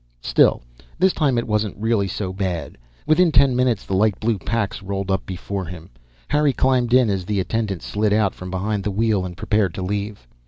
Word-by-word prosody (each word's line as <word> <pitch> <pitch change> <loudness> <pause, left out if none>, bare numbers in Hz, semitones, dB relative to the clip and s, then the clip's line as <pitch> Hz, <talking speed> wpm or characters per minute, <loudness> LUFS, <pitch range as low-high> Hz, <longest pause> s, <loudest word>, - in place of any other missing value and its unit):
Still, - - +3 0.3
this 190 0 +3
time 140 -6 +1
it 120 - 0
wasn't 105 -2 -1
really 110 -2 +1
so 95 0 -4
bad. 95 -3 -3 0.3
Within 165 +2 +4
ten 135 -2 +4
minutes 125 -4 +1
the - - -4
light 100 0 +2
blue 110 -2 0
Pax 110 -1 -2
rolled 95 0 -3
up 95 0 -1
before 95 +1 -4
him. 85 0 -10 0.4
Harry 150 -2 +2
climbed 125 -3 +1
in 125 -1 +5
as 95 -3 -1
the 105 +1 -1
attendant 100 0 -2
slid 105 0 0
out 105 -2 +2
from 90 - -8
behind 100 +2 -2
the 105 - -1
wheel 105 -1 +1
and 90 -1 -7
prepared 100 -1 0
to 95 - -4
leave. 100 - -4
105 Hz, 200 wpm, -21 LUFS, 95-115 Hz, 0.4 s, in